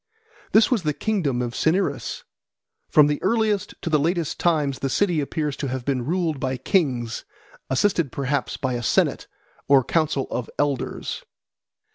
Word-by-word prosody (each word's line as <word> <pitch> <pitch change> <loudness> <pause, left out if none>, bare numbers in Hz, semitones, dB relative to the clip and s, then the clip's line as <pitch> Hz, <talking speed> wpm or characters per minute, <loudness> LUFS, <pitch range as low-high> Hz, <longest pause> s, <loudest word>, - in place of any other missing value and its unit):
This 220 +3 +5
was 240 -6 +2
the 150 -3 -1
kingdom 155 - 0
of 120 -1 -4
Cinyras. 160 0 0 0.7
From 150 - +6
the 145 0 0
earliest 215 -1 +1
to - - -1
the 150 - +4
latest 170 +1 -1
times 150 -6 +1
the 135 - -1
city 175 +1 +1
appears 150 0 -2
to 140 - -3
have 130 -1 -4
been 130 -3 -1
ruled 165 -4 0
by 130 0 -1
kings, 125 - 0 0.5
assisted 160 +1 +1
perhaps 140 +1 -2
by 130 -2 -2
a 120 - -2
senate 120 - +1 0.4
or 135 -2 +6
council 155 -1 0
of 125 - -3
elders. 145 -3 -2
145 Hz, 155 wpm, -23 LUFS, 130-175 Hz, 0.7 s, From